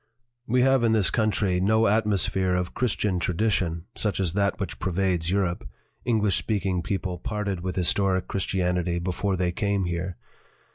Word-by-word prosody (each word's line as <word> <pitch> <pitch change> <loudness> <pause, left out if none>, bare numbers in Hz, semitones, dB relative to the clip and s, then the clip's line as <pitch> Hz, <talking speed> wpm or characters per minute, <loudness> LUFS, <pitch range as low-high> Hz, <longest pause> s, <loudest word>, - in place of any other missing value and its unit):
"We 125 +2 +3
have 135 -2 +4
in 115 -1 +3
this 105 -4 +3
country 105 -4 +1
no 110 +3 +3
atmosphere 100 -3 +2
of 90 0 -2
Christian 105 -6 0
tradition 85 -3 0
such 105 -4 -1
as 90 -4 0
that 100 +1 0
which 95 - -4
pervades 90 -2 0
Europe 95 -2 -1 0.4
English 105 -5 +2
speaking 95 -4 -1
people 95 -1 -3
parted 100 -1 -3
with 90 +1 -4
his 90 -2 +4
toric 95 -2 +1
Christianity 90 -2 -1
before 95 +3 -1
they 90 -1 0
came 100 0 0
here. 85 +1 -3
95 Hz, 155 wpm, -25 LUFS, 90-105 Hz, 0.4 s, have